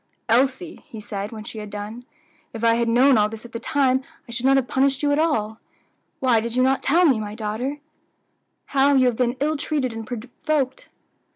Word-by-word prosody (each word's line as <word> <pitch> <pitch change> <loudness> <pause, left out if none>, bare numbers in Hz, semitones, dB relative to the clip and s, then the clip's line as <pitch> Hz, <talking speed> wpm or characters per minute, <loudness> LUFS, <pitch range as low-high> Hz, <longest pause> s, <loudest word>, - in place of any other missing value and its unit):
"Elsie," 265 +8 +1
he 220 - -9
said 205 -1 -5
when 220 -2 -8
she 220 0 -8
had 210 -1 -7
done, 210 +4 -7 0.5
"if 225 0 -7
I 230 0 +5
had 235 0 +1
known 250 +1 +5
all 210 0 +3
this 225 +1 -9
at 235 - -11
the 230 - -5
time, 265 -1 +1 0.2
I - - -10
should 245 +2 -1
not 270 0 +5
have 260 -2 0
punished 270 +1 +1
you 290 - +2
at 285 - +2
all. 220 -9 0 0.6
Why 250 -4 +3
did 230 +1 -4
you 255 - +3
not 265 +1 +2
tell 345 +6 +3
me, 265 -8 +4
my 210 0 -5
daughter, 225 +6 -3 1.0
how 280 +1 +4
you 260 -1 +5
have 245 -2 +2
been 245 +1 0
ill 305 +2 0
treated 280 -5 -2
and 225 -1 -7
provoked?" 255 +3 -3
250 Hz, 210 wpm, -23 LUFS, 225-270 Hz, 1.0 s, I